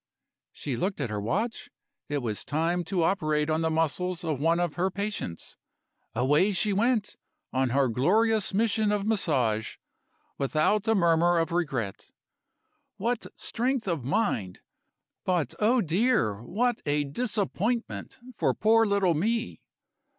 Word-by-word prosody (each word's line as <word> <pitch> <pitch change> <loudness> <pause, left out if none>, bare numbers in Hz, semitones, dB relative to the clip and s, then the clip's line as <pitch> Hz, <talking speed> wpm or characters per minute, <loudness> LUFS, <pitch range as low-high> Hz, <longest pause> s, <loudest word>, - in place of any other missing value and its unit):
She 140 -4 -4
looked 185 - -2
at 125 -6 -2
her 105 -1 -2
watch; 215 - -2 0.4
it 145 -3 -1
was 110 -3 -2
time 165 +4 0
to 175 0 0
operate 155 -4 +1
on 160 +1 +1
the 160 - +1
muscles 165 +3 -1
of 155 -5 -2
one 165 +3 +2
of 175 -3 0
her 185 +2 0
patients. 200 - -4 0.6
Away 145 - +3
she 205 +2 +2
went, 215 0 +1 0.4
on 130 0 +1
her 135 +2 +2
glorious 210 - +2
mission 215 +1 +1
of 205 -1 0
Massage, 130 - 0 0.6
without 155 - +1
a 225 - +4
murmur 170 -1 +3
of 165 +1 0
regret. 135 - -2 0.9
What 235 +3 -2
strength 245 -1 -1
of 165 -8 -1
mind! 130 - -1 0.6
But, 175 -9 0
oh, 235 +4 +3
dear, 170 - +1
what 230 - -1
a 145 0 +2
disappointment 220 - -2 0.2
for - - +1
poor 225 +1 +4
little 200 -3 +2
me! 225 +9 -1
175 Hz, 135 wpm, -27 LUFS, 145-215 Hz, 0.9 s, a